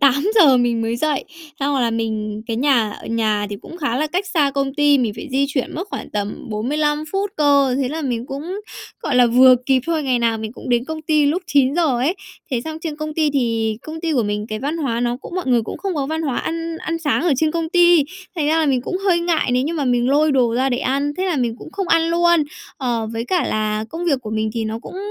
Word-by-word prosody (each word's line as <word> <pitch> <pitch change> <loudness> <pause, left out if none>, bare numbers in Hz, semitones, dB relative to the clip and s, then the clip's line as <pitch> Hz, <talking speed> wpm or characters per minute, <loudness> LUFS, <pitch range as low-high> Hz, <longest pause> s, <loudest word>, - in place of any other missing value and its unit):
8:00 280 - +5
mình 240 -2 +1
mới 225 +1 -1
dậy. 295 +2 0 0.4
Xong 280 +1 +1
rồi 265 - +1
là 235 - +1
mình 215 -2 -3
cái 225 -2 -2
nhà, 245 -4 +2
ờ, - - -10
nhà 215 -2 0
thì 205 - -4
cũng 340 - -10
khá 285 -8 -1
là 305 - +1
cách 365 +6 -2
xa 310 -7 +2
công 275 -1 -2
ty, 290 -1 +4
mình 235 -5 0
phải 315 - -7
di 275 +2 +2
chuyển 275 -3 -2
mất 345 - -3
khoảng - - -6
tầm 205 0 -4
45 295 +8 -1
phút 395 +1 -1
cơ. 280 -3 +3
Thế 255 - -1
là 315 +4 -4
mình 245 -3 -2
cũng 320 +10 -5 0.4
gọi 285 - -1
là 250 -1 +6
vừa 255 +2 +7
kịp 265 -1 +3
thôi, 330 -2 0
ngày 260 -3 +1
nào 230 -1 +1
mình 220 0 -5
cũng - - -10
đến 240 -1 +2
công 315 +2 -6
ty 305 -2 +2
lúc 335 +6 0
9:00 285 +4 +3
ấy. 280 +9 +1 0.4
Thế 250 -3 0
xong 315 +5 -6
trên 320 -3 -4
công 305 0 -5
ty, 310 -1 +2
thì 230 -5 0
công 315 +1 -7
ty 330 -1 -1
của 255 -5 +2
mình 210 0 -2
cái 215 - -3
văn 290 +7 -2
hóa 255 -8 -1
nó 240 0 0
cũng - - -9
mọi 370 -4 -3
người 245 -3 +3
cũng - - -6
không 390 -2 -3
có 280 -3 -1
văn 315 +2 -2
hóa 275 -6 -1
ăn 330 0 -3
ăn 330 +1 -3
sáng 300 -3 0
ở 345 -3 +2
trên 310 +4 +2
công 330 0 -2
ty, 345 -3 +5 0.3
thành 305 -3 0
ra 320 +1 +3
là 315 - +2
mình 265 -3 +2
cũng 365 - -3
hơi 375 -3 +2
ngại 340 -6 +1
nếu 250 +1 +2
như 310 - -2
mà 300 -4 -1
mình 245 -1 +2
lôi 295 +2 +3
đồ 245 -4 +2
ra 260 +2 +2
để 245 -2 0
ăn, 280 +3 0
thế 370 - -1
là 360 -5 0
mình 240 -4 0
cũng 315 - -11
không 390 -2 -3
ăn 330 -1 +4
luôn. 340 -1 +3 0.3
Ờ, 235 -4 -1
với 225 0 -3
cả 360 +6 +1
là 215 - -1 0.3
công 335 +2 -4
việc 285 -7 +1
của 215 - -6
mình 215 0 -1
thì 225 -1 -1
nó 220 +1 -3
cũng 265 - -10
280 Hz, 270 wpm, -20 LUFS, 240-320 Hz, 0.4 s, vừa